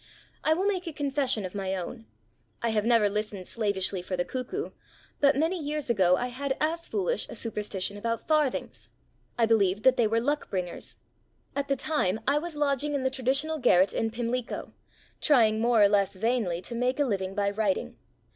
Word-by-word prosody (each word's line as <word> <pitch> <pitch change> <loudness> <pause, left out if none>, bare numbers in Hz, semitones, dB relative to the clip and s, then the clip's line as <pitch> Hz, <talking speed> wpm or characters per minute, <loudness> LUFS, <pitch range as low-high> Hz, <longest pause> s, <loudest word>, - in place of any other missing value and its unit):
I 315 - +3
will 375 +4 -1
make 380 -3 0
a 330 - -4
confession 275 -7 0
of 180 - -6
my 195 -1 -2
own. 225 +6 -6 0.6
I 235 - +2
have 215 -1 +1
never 230 -3 +4
listened 205 -2 -3
slavishly 200 -4 -1
for 185 +1 -4
the 175 - 0
cuckoo, 260 - -4 0.5
but 285 -1 +4
many 325 +6 +1
years 295 -3 -2
ago 185 -5 +4
I 245 - -2
had 265 +2 -3
as 330 +2 -1
foolish 460 +4 -1
a - - -7
superstition 205 -3 -3
about 230 +2 -3
farthings. 305 -4 0 0.5
I 235 - +4
believed 210 -3 +2
that 260 0 +5
they 235 -3 +4
were 225 +2 +1
luck 290 +5 -1
bringers. 180 -3 -4 0.6
At 280 0 -1
the 275 - +1
time 235 -9 0
I 285 +2 +3
was 335 0 -6
lodging 290 0 0
in 275 - -1
the 260 - +1
traditional 270 +5 +1
garret 185 -6 +4
in 225 - 0
Pimlico, 235 +1 -3 0.5
trying 225 -7 +4
more 230 -2 +4
or - - +8
less 200 -1 +2
vainly 200 -5 0
to - - -6
make 250 +3 0
a 290 - +3
living 195 -5 -2
by 200 -1 +1
writing. 200 - -1
235 Hz, 190 wpm, -28 LUFS, 205-285 Hz, 0.6 s, or